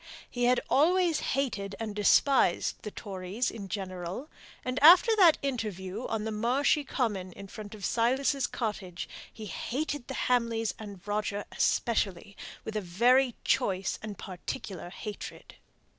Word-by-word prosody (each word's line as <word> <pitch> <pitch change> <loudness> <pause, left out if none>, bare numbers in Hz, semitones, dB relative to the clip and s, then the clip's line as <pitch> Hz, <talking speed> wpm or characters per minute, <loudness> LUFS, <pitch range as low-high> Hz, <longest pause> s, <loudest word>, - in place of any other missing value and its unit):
He 245 -1 -1
had 250 +1 +4
always 340 +3 +3
hated 210 -8 -2
and 220 -2 -4
despised 210 0 +3
the 210 - -5
Tories 200 +3 -3
in 205 -3 -7
general; 185 - -5 0.4
and 255 +2 -2
after 360 +9 +8
that 355 -7 +7
interview 215 -5 -3
on 220 -1 -2
the 220 - -2
marshy 250 +7 +2
common 210 -9 -2
in 200 - -10
front 210 +1 -9
of 205 - -6
Silas's 260 +3 +1
cottage, 200 -6 -4 0.2
he 220 - -9
hated 270 - -3
the - - -5
Hamleys 230 -3 +1
and 200 -3 -10
Roger 205 0 -1
especially, 200 -4 0 0.3
with 220 - -5
a 215 - 0
very 240 +8 +3
choice 190 -1 +1
and 210 -3 -6
particular 185 0 -6
hatred. 205 +3 -8
220 Hz, 140 wpm, -29 LUFS, 200-255 Hz, 0.4 s, after